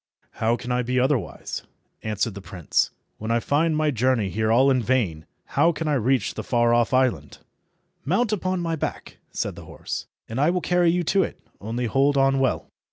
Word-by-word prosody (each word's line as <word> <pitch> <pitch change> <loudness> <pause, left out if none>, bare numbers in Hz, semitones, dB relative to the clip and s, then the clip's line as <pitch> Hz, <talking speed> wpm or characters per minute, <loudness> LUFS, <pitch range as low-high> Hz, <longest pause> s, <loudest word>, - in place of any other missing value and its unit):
"How 115 +1 +1
can 125 +1 -6
I 125 0 +2
be 125 +1 0
otherwise," 125 - -1 0.4
answered 110 0 -1
the 100 - -8
prince, 90 -4 0 0.3
"when 110 - -5
I 115 +1 +3
find 155 +5 +1
my 155 -1 +2
journey 125 -4 +1
here 110 +1 0
all 130 +4 +5
in 130 -2 +2
vain? 105 -10 0 0.3
How 170 - +4
can 160 0 -4
I 150 - +2
reach 130 -3 +1
the - - -5
far 120 -1 +2
off 120 0 +2
island?" 125 - +1 0.7
"Mount 205 - +1
upon 185 -2 -1
my 165 -1 -1
back," 155 - -5
said - - -3
the - - -11
horse, - - -6 0.2
"and 115 +4 -2
I 150 - +4
will 180 +1 +1
carry 175 -1 +3
you 175 +1 +1
to 195 +4 +2
it. - - -3 0.2
Only 115 +4 -3
hold 140 +4 +2
on 135 0 +3
well." 135 -1 0
130 Hz, 200 wpm, -24 LUFS, 115-150 Hz, 0.7 s, all